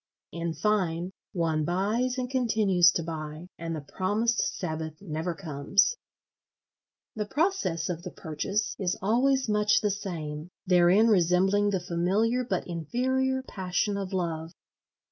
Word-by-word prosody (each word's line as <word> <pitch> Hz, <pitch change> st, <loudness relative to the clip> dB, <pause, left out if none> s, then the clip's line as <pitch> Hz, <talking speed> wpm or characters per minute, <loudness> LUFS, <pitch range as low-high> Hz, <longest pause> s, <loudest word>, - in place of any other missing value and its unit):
In 170 Hz, 0 st, -3 dB
fine, 185 Hz, -4 st, 0 dB, 0.2 s
one 160 Hz, -3 st, 0 dB
buys 210 Hz, -, 0 dB
and 250 Hz, -1 st, -1 dB
continues 215 Hz, -9 st, +4 dB
to 170 Hz, -, -1 dB
buy; 155 Hz, 0 st, -6 dB
and 165 Hz, 0 st, -3 dB
the 155 Hz, -, -5 dB
promised 210 Hz, +9 st, 0 dB, 0.2 s
Sabbath 160 Hz, -3 st, -4 dB
never 165 Hz, -2 st, -3 dB
comes. 165 Hz, -, +1 dB, 1.2 s
The 210 Hz, -2 st, -3 dB
process 290 Hz, -, 0 dB
of 170 Hz, -2 st, -3 dB
the -, -, -6 dB
purchase 195 Hz, +7 st, -3 dB
is 185 Hz, -2 st, 0 dB
always 260 Hz, +6 st, +2 dB
much 210 Hz, -1 st, +3 dB
the 210 Hz, -, +1 dB
same, 165 Hz, -5 st, -5 dB, 0.2 s
therein 180 Hz, +4 st, +5 dB
resembling 190 Hz, +1 st, +3 dB
the 195 Hz, -2 st, 0 dB
familiar 195 Hz, +8 st, +1 dB
but 195 Hz, -7 st, -2 dB
inferior 260 Hz, -, -1 dB
passion 190 Hz, -1 st, -1 dB
of 195 Hz, -1 st, -4 dB
love. 165 Hz, -3 st, -2 dB
185 Hz, 130 wpm, -28 LUFS, 165-215 Hz, 1.2 s, therein